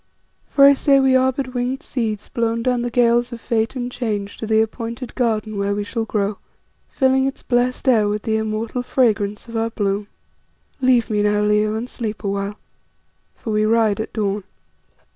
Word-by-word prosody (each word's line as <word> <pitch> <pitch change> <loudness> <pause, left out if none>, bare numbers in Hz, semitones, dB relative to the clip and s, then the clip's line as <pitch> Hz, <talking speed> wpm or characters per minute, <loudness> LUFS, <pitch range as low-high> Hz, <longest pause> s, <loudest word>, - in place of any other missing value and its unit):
For 275 - +6
I 280 - +8
say 275 0 +3
we 265 -1 +4
are 260 0 +4
but 260 -1 -5
winged 250 +2 -2
seeds 220 -5 -3
blown 230 0 -1
down 250 -1 +1
the 240 - -2
gales 240 0 +2
of 235 - -6
fate 225 +1 -1
and 245 -1 -3
change 210 -5 -3
to 220 - -5
the 220 0 +3
appointed 230 +2 -3
garden 215 -4 -1
where 200 0 0
we 205 - -2
shall 225 +2 -3
grow, 205 -2 -1 0.5
filling 265 0 +2
its 270 - -6
blest 250 +2 0
air 220 -5 +4
with 210 0 -2
the 220 -2 0
immortal 220 +2 -2
fragrance 215 -5 0
of 230 - -9
our 225 0 0
bloom. 205 -2 -2 0.7
"Leave 250 -3 +3
me 210 -1 +1
now, 210 0 +2
Leo, 210 +1 +2
and 230 +3 -3
sleep 220 -4 -5
awhile, 200 +1 -2 0.8
for 220 - -5
we 210 0 +2
ride 220 -2 +2
at 220 - -4
dawn." 205 -2 -1
225 Hz, 185 wpm, -21 LUFS, 210-245 Hz, 0.8 s, I